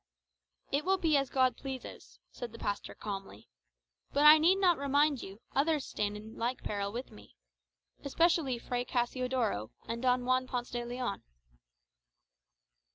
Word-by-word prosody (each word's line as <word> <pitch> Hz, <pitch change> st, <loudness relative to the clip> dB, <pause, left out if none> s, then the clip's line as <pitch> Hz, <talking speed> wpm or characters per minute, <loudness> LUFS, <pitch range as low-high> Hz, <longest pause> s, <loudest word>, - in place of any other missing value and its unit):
"It 285 Hz, +2 st, +1 dB
will 385 Hz, +3 st, +2 dB
be 325 Hz, -5 st, +2 dB
as 275 Hz, -1 st, +2 dB
God 260 Hz, -1 st, +2 dB
pleases," 265 Hz, -2 st, -8 dB
said 245 Hz, -2 st, -7 dB
the -, -, -9 dB
pastor 205 Hz, -2 st, -4 dB
calmly. 195 Hz, -, -7 dB, 0.6 s
"But 285 Hz, +1 st, +3 dB
I 305 Hz, +1 st, +10 dB
need 340 Hz, +5 st, +5 dB
not 365 Hz, -5 st, +3 dB
remind 285 Hz, 0 st, +2 dB
you, 195 Hz, +3 st, -10 dB
others 300 Hz, +1 st, +2 dB
stand 210 Hz, 0 st, -2 dB
in 220 Hz, +1 st, -11 dB
like 240 Hz, +3 st, -2 dB
peril 200 Hz, -1 st, -2 dB
with 245 Hz, +4 st, -6 dB
me. 105 Hz, -8 st, -15 dB, 0.7 s
Especially 300 Hz, -3 st, +2 dB
Fray 245 Hz, +1 st, -3 dB
Cassiodoro, 245 Hz, -, -1 dB, 0.2 s
and 235 Hz, 0 st, -3 dB
Don 250 Hz, -1 st, +2 dB
Juan 255 Hz, 0 st, +2 dB
Ponce 245 Hz, -1 st, -3 dB
de 240 Hz, 0 st, -2 dB
Leon." 240 Hz, -3 st, -4 dB
255 Hz, 150 wpm, -32 LUFS, 230-280 Hz, 0.7 s, I